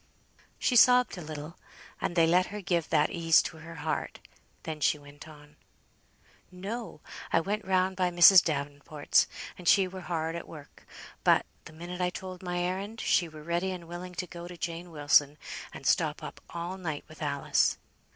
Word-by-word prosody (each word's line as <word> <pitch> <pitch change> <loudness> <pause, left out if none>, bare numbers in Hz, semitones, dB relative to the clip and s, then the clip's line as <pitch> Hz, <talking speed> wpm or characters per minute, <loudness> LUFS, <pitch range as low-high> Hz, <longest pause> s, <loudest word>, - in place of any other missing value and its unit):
She 250 - +1
sobbed 250 +1 +6
a 180 - -7
little; 155 0 -8 0.4
and 175 - -2
they 165 -2 +5
let 180 +3 +3
her 210 +2 -6
give 175 -4 -1
that 150 -1 +2
ease 165 -1 +4
to 165 - -6
her 165 +1 -10
heart. - - -3 0.5
Then 160 -1 -5
she 150 - +3
went 145 +1 -14
on 150 -1 -15 0.9
"No! 195 -1 -6 0.3
I - - +4
went 205 +5 -3
round 185 0 +1
by 180 -1 +2
Mrs. 175 +1 +8
Davenport's, 145 0 0 0.3
and 180 - -7
she 195 +1 +5
were 185 0 -8
hard 165 -1 -3
at 170 - -6
work; 145 -3 -13 0.4
but, - - +4 0.2
the - - -11
minute 175 +3 -7
I 180 - +2
told 185 0 -8
my 180 -1 -3
errand, 195 +5 -3
she 175 -5 +2
were 155 -1 -11
ready 170 +3 -1
and 180 -3 -6
willing 175 +1 -8
to 180 - -3
go 175 0 -9
to 175 0 -10
Jane 170 +1 -5
Wilson, 145 -1 +3 0.3
and - - -10
stop - - +1
up - - -8
all 170 +3 -5
night 160 -5 -4
with 155 +1 -14
Alice." 140 -2 +1
170 Hz, 180 wpm, -29 LUFS, 155-185 Hz, 0.9 s, Mrs